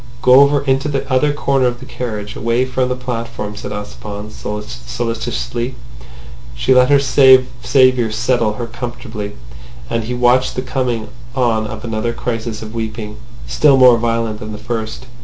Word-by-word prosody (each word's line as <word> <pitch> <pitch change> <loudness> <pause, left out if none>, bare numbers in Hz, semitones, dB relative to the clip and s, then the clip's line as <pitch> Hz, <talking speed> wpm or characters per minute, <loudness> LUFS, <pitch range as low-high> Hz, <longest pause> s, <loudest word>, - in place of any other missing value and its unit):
"Go 125 +1 +7
over 140 0 +4
into 135 +1 +1
the 140 -1 -2
other 145 +3 +3
corner 135 -3 +1
of 120 0 -3
the - - -10
carriage, 105 -4 -5
away 115 +3 +1
from 130 0 -1
the 125 - 0
platform," 115 -4 -5
said - - -7
Ossipon 105 0 -7
solicitously. 115 - -4 0.8
She - - +2
let 125 0 +5
her 145 - +6
saviour 130 -2 +4
settle 115 0 +1
her 120 +3 -4
comfortably, 120 -3 -6 0.6
and 115 -1 -1
he 125 +2 -3
watched 125 +1 +3
the 130 - -2
coming 125 -4 -2 0.3
on 115 -4 +1
of 110 -1 -7
another 115 +1 -2
crisis 115 -2 -4
of 110 0 -9
weeping, 110 -2 -5 0.3
still 145 -3 +4
more 125 -3 +7
violent 115 -2 -1
than 110 -1 -7
the - - -6
first. 110 +1 -5
120 Hz, 155 wpm, -17 LUFS, 110-130 Hz, 0.8 s, Go